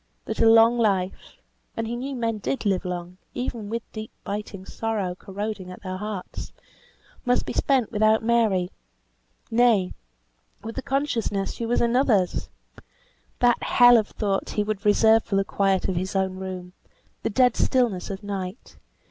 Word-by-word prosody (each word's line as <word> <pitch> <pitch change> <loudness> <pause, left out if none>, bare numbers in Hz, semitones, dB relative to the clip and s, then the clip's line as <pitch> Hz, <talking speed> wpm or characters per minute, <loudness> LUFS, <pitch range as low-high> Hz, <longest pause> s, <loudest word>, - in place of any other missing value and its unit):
That - - -4
a 225 - +6
long 225 +1 +6
life 195 -4 -1 0.4
(and 225 - -1
he 235 +2 -3
knew 265 +3 -4
men 230 -3 -1
did 245 +4 -3
live 195 -1 +1
long, 180 0 -5 0.2
even 235 -4 -4
with 230 +1 -3
deep, 215 0 -7
biting 200 -1 -5
sorrow 210 -5 -2
corroding 195 +1 -5
at 185 - -11
their 185 -1 -4
hearts) 210 -2 -6 0.7
must 245 -1 +1
be - - -4
spent 265 -5 +1
without 215 0 +3
Mary; 220 -6 +2 0.8
nay, 225 -5 +3 0.7
with 225 +1 -6
the 265 - -3
consciousness 255 -8 -1
she 230 - -4
was 240 - +1
another's! 235 -6 +2 0.9
That 245 -1 +4
hell 245 -1 +6
of 220 -3 +3
thought 200 -3 -2
he 210 - 0
would 210 -1 -4
reserve 220 +2 +5
for 200 - -3
the 195 0 +2
quiet 195 -2 +1
of 190 - -1
his 185 +3 -3
own 190 -1 0
room, 185 -1 -6 0.5
the - - -1
dead 245 +2 +3
stillness 235 -9 +1
of 195 0 -6
night. 195 +1 -6
215 Hz, 160 wpm, -25 LUFS, 190-235 Hz, 0.9 s, a